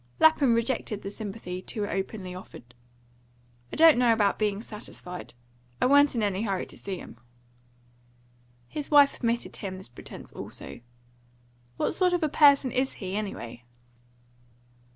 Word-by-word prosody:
Lapham 290 -6 +5
rejected 230 -3 -1
the 195 - -5
sympathy 195 -4 -6
too 205 +2 -3
openly 195 -1 -4
offered. 125 -9 -11 1.0
"I - - -5
don't 320 -5 +7
know 245 -2 +5
about 210 -3 +2
being 205 -2 0
satisfied. 180 - -8 0.4
I - - +2
wa'n't 285 +1 +5
in 225 - 0
any 200 -1 0
hurry 195 -4 -1
to - - -11
see 195 -2 -5
him." 120 - -11 1.5
His 295 - -6
wife 285 -2 +6
permitted 235 -1 -1
him 190 -3 -5
this 185 - -9
pretence 120 - -10
also. - - -8 1.0
"What - - 0
sort 360 +1 +2
of 350 -2 +1
a 310 - +2
person 280 -3 +5
is 265 +1 0
he, 190 -1 -5
anyway?" 120 - -5
215 Hz, 145 wpm, -27 LUFS, 190-270 Hz, 1.5 s, don't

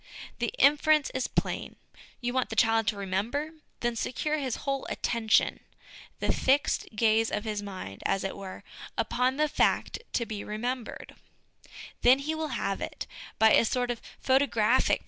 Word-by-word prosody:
The - - 0
inference 300 - +4
is 260 - -1
plain. - - -2 0.5
You 245 0 -2
want 260 -1 0
the - - -4
child 225 -1 +3
to 210 - +1
remember? 205 +11 -2 0.3
Then 240 -1 0
secure 300 +7 -1
his 260 -4 -2
whole 275 -1 -1
attention, 225 -2 +1 0.6
the - - +1
fixed 275 +2 +2
gaze 225 +1 +3
of 210 - -2
his 210 -2 -3
mind, 185 - -7
as 195 - 0
it 195 - -3
were, 195 0 -8 0.3
upon 250 +4 +1
the 305 0 +3
fact - - +1
to 235 - +1
be 215 -2 -5
remembered; 240 +3 -4 0.9
then 250 +2 +7
he 290 +3 -2
will 315 0 -2
have 195 0 -2
it: - - -5 0.3
by 220 0 +6
a - - +6
sort 245 +1 0
of 235 - -5 0.2
photographic 260 -3 +3
240 Hz, 160 wpm, -28 LUFS, 215-270 Hz, 0.9 s, then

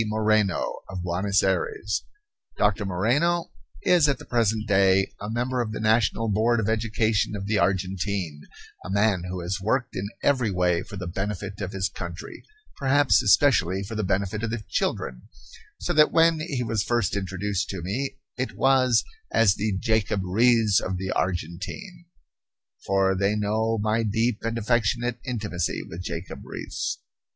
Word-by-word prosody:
Moreno, 110 -3 +1
of 95 -2 -5
Buenos 95 +3 +1
Aires. 260 - -1 0.5
Doctor 105 0 +1
Moreno 140 - +1 0.3
is 170 -5 +4
at 140 - +1
the - - -12
present 110 -2 0
day 95 -1 +3
a 105 - -4
member 125 +2 -1
of 110 -2 -3
the - - -4
National 110 0 +2
Board 110 +3 +2
of 105 - -1
Education 110 -1 +1
of 100 -1 -5
the 105 0 +1
Argentine, 95 -4 -1 0.4
a - - -7
man 100 -2 +2
who 90 0 -4
has 95 +3 -3
worked 125 +6 -1
in 100 +2 -3
every 130 -6 +2
way 90 -2 +1
for 100 +2 -9
the 90 - -5
benefit 100 +2 -4
of 95 -1 -3
his 95 -1 -1
country, 85 -3 -8 0.3
perhaps 140 0 +4
especially 100 -6 +3
for 105 +4 -7
the 110 -1 -1
benefit 100 +2 -1
of 115 - -2
the 115 -1 -4
children, - - -2 0.5
so - - -2
that 155 0 +5
when 165 -1 +4
he 145 -6 -2
was 115 -3 -1
first 120 -4 0
introduced 95 0 -2
to 95 -4 -5
me 130 +10 -3 0.2
it 130 - -3
was 130 -3 +4 0.3
as 110 -4 +4
the 105 -1 -1
"Jacob 105 -2 0
Riis 110 +1 +3
of 95 -1 -3
the 95 0 -3
Argentine" 95 - -4 0.8
for 95 0 +3
they 100 +2 +1
know 110 +2 0
my 110 +2 +1
deep 115 +1 0
and 115 0 -2
affectionate 120 +1 0
intimacy 105 - -2
with 85 +2 -7
Jacob 85 0 -6
Riis. - - -4
105 Hz, 160 wpm, -25 LUFS, 95-115 Hz, 0.8 s, that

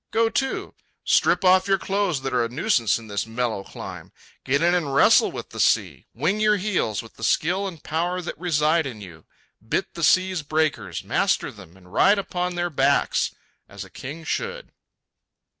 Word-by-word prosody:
Go 225 0 +1
to. 270 +3 -2 0.3
Strip - - +3
off 185 +1 +5
your 195 0 +3
clothes 195 -7 -1
that 135 - -3
are 120 -1 +2
a 115 - -2
nuisance 125 - +1
in 115 -1 -11
this 100 +1 -3
mellow 115 -3 -2
clime. - - -9 0.3
Get 140 +4 +1
in 175 +1 +4
and 150 -6 0
wrestle - - +5
with - - -8
the - - -8
sea; - - +1
wing 170 - -1
your 210 -1 +3
heels 185 - -1
with 115 - -16
the 115 - -10
skill 180 - +1
and 170 -5 -9
power 175 +3 -1
that 175 - -5
reside 160 -2 +1
in 120 -5 -8
you; 85 -6 -12 0.4
bit 115 +12 -2
the 170 - -7
sea's 185 +2 +3
breakers, 155 +1 -1
master - - 0
them, 85 +4 -15
and 90 0 -19
ride 200 - +5
upon 180 -2 -3
their 175 0 -2
backs 140 -1 +1 0.3
as - - -8
a - - -17
king 155 +5 -8
should. 485 - -4
165 Hz, 185 wpm, -23 LUFS, 125-185 Hz, 0.4 s, off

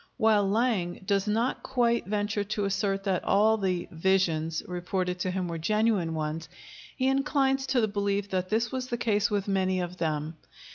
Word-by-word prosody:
While 215 -4 +3
Lang 200 -6 0
does 195 +1 +1
not 225 +4 0
quite 235 -5 +1
venture 205 0 -1
to 205 0 -2
assert 195 0 -1
that 190 -3 0
all 215 +2 +3
the 185 -3 -1
"visions" 165 -2 +1
reported 180 0 -2
to 185 - -1
him 180 -1 -2
were 165 -1 -4
genuine 210 -2 +1
ones, 155 +1 -3 0.5
he 260 - +1
inclines 270 0 +1
to 255 -2 +2
the 220 - +2
belief 200 -1 -1
that 185 -1 -1
this 225 +1 0
was 255 -1 -3
the 240 - -2
case 215 -3 +1
with 205 -2 -1
many 190 -1 +1
of 180 0 -4
them. 155 -1 -2
200 Hz, 180 wpm, -28 LUFS, 180-220 Hz, 0.5 s, While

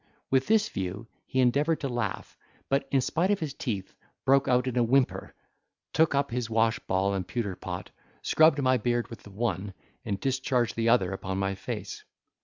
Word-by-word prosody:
With 130 0 +3
this 215 0 +4
view 95 +3 -4 0.2
he 130 - -1
endeavoured 145 +6 +3
to 140 - -1
laugh, 120 -6 -3 0.3
but 135 +1 +1
in 135 - +3
spite 170 +8 0
if 205 -1 +2
his 155 -6 -3
teeth, 110 -9 -4 0.3
broke 135 +1 +4
out 125 0 +3
in 130 -2 -2
a 125 - +3
whimper, 130 +2 +1 0.6
took 160 -2 +3
up 140 -2 +1
his 120 -1 -2
wash 115 -1 +2
ball 95 +1 0
and 95 -2 -2
pewter 110 -6 -2
pot, 90 0 -6 0.3
scrubbed 155 -2 +5
my 130 0 +4
beard 120 +1 -1
with 115 - -9
the - - -13
one, 100 -2 -3 0.3
and 100 -5 -3
discharged 130 -2 0
the 115 0 +1
other 100 -6 +3
upon 95 0 -4
my 95 0 0
face. 95 - -6
120 Hz, 190 wpm, -28 LUFS, 100-135 Hz, 0.6 s, scrubbed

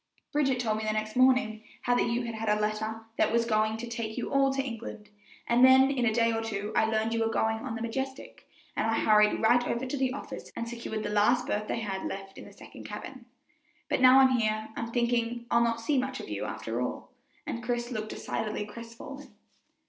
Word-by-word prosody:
"Bridget 270 -4 +2
told 215 -3 0
me - - -4
the 215 0 0
next 215 0 -3
morning 255 -4 +3 0.2
how 245 - +2
that 245 - +2
you 235 +1 0
had 230 -1 -4
had 220 0 -3
a 210 0 +2
letter 215 +1 -2
that - - +3
was 230 0 +2
going 215 -1 +1
to 240 +1 -6
take 230 -2 -4
you 245 - -3
all 275 0 +4
to 270 - -3
England, 230 -4 -7 0.4
and 240 +1 +3
then 260 +1 +7
in 250 -3 +1
a - - +3
day 230 0 +2
or 225 - -1
two 215 -2 -4
I - - +4
learned 220 0 0
you 230 0 +1
were 225 - +1
going 220 0 +1
on 230 0 -5
the 225 - -4
Majestic, 265 +3 -5 0.3
and - - 0
I 225 - +1
hurried 210 0 +4
right 245 +2 +5
over 235 +3 -1
to 265 +2 -3
the 260 -1 +1
office 280 - -7
and 230 - -4
secured 230 -2 -5
the - - -2
last 210 +4 +3
berth 210 0 -2
they 230 - -2
had 195 -3 -3
left 195 0 -7
in - - -10
the - - -12
second - - -12
cabin. 255 -3 -8 0.6
But - - +1
now 255 +1 +8
I'm 265 - +6
here 215 0 -1
I'm 230 0 -4
thinking 235 0 0
I'll 235 - +4
not 230 0 0
see 275 +4 +1
much 265 +1 -3
of - - -7
you, - - -3
after - - -4
all," - - -4 0.3
and 235 - -4
Chris 240 0 -2
looked 215 -2 -4
decidedly 215 -1 -3
crestfallen. 230 +6 -10
230 Hz, 230 wpm, -29 LUFS, 220-245 Hz, 0.6 s, now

